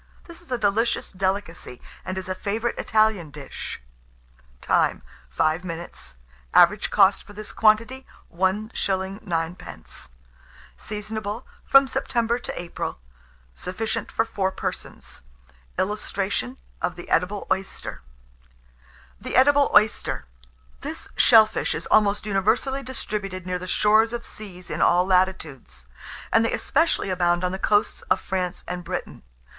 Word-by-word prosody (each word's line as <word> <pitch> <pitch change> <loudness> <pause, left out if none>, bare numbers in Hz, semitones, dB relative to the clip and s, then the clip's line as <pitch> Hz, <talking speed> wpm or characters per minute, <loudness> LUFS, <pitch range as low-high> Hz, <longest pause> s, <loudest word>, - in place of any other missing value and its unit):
This 340 0 -12
is 345 - -16
a 250 - +1
delicious 220 +2 +1
delicacy, 190 -8 -3 0.2
and 185 - -4
is 190 - -4
a 185 - -1
favourite 215 +5 -2
Italian 215 -7 +2
dish. 145 -2 -7 0.8
Time. - - +1 0.3
5 160 +3 +1
minutes. 170 - -7 0.4
Average - - +6
cost - - +5
for 205 - -14
this 210 0 -8
quantity, 230 +5 +2 0.3
1s. 190 +5 0 0.5
9d. 165 - -5 0.7
Seasonable 210 +2 -5 0.2
from 275 0 +6
September 240 -3 0
to - - -5
April. 175 -1 -5 0.6
Sufficient 205 - -4
for 225 - +1
4 190 -4 -1
persons. - - -6 0.6
[Illustration: 205 +4 -2 0.2
THE 175 -1 -3
EDIBLE 195 +4 0
OYSTER.] 190 - -3 1.2
THE - - -4
EDIBLE 285 +2 +5
OYSTER: 210 +1 +3 0.5
This - - -7
shell 220 -1 +8
fish 215 - -2
is - - -4
almost 205 -1 +3
universally 220 +7 +1
distributed 205 -8 -4
near 180 0 -2
the 185 - -7
shores 215 +4 +3
of 240 0 -4
seas 185 -4 -10
in - - -2
all 180 +1 +4
latitudes, 160 - 0 0.5
and 225 - +5
they 230 - +1
especially 310 - +1
abound 175 -1 +2
on 180 - +1
the 190 - -4
coasts 205 +1 +2
of - - +3
France 185 -2 -3
and 180 0 -4
Britain. - - -5
200 Hz, 130 wpm, -24 LUFS, 180-225 Hz, 1.2 s, shell